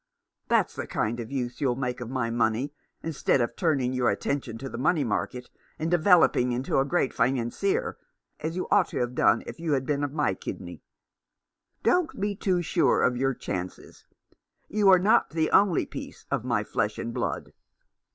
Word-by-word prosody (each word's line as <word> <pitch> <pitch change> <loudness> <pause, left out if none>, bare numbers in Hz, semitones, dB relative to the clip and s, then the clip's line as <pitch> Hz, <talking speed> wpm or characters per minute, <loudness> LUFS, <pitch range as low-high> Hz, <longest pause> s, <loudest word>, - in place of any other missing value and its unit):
That's - - +2
the - - -5
kind 115 +3 -1
of 115 +2 -6
use 125 -3 -3
you'll 130 -4 +2
make 125 -1 -3
of 120 - -5
my 125 -3 -1
money; 115 +4 0 0.3
instead 160 -4 +1
of 120 -1 -1
turning 135 -7 +1
your 125 -1 +2
attention 140 -5 -2
to 135 - -6
the 115 - -6
money 150 +3 +2
market, 125 +2 -3 0.3
and 160 +2 -2
developing 170 -8 +4
into 125 +2 0
a 135 - +2
great 145 -3 0
financier 135 - 0 0.2
— - - -59
as 160 +1 -3
you 185 - -3
might 200 -4 +4
have 120 0 -2
done - - +3
if - - -8
you 165 -3 -1
had 135 -1 0
been 145 0 0
of 145 - -1
my 150 0 +1
kidney. - - -7 1.0
Don't 360 -3 +1
be 205 +1 -1
too 185 -3 0
sure 170 +1 +2
of 125 - +3
your 135 +1 0
chances. 90 -4 -6 0.6
You 205 -2 +3
are 185 - +8
not 195 +5 +3
the 160 0 0
only 195 -4 +4
piece - - -9
of - - 0
my - - 0
flesh - - -1
and 115 - -4
blood. - - -3
135 Hz, 185 wpm, -27 LUFS, 125-170 Hz, 1.0 s, are